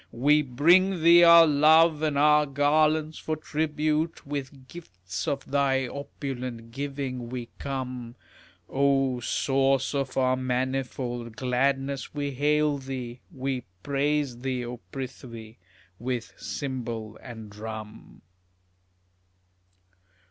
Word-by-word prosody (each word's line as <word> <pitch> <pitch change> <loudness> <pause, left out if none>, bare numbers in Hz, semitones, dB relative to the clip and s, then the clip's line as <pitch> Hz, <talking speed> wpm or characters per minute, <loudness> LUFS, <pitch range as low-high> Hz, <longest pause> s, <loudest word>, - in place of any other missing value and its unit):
We 145 +5 +3
bring 170 +7 +3
thee 170 +1 +8
our 170 -1 +9
love 155 +1 +5
and 150 -2 0
our 150 +1 +5
garlands 155 +2 +2
for 155 - -2
tribute, 155 +1 -1
With 140 -2 -6
gifts 95 - -7
of 140 -2 -2
thy 135 -2 +2
opulent 125 -4 -6
giving 135 -2 -4
we 125 -1 -6
come; 125 -3 -5 0.5
O 135 -2 +1
source 135 +2 +1
of 135 -2 -2
our 130 -1 +3
manifold 125 -2 -3
gladness, 135 +2 -1
we 145 -1 -2
hail 150 +1 +1
thee, 130 -2 -6
We 130 -1 -3 0.2
praise 140 -2 0
thee, 130 -1 -2
O 120 +1 -6
Prithvi, 120 -4 -8 0.4
with 120 -1 -4
cymbal 115 -6 -5
and 110 -4 -10
drum. 110 0 -9
135 Hz, 105 wpm, -27 LUFS, 125-150 Hz, 0.5 s, our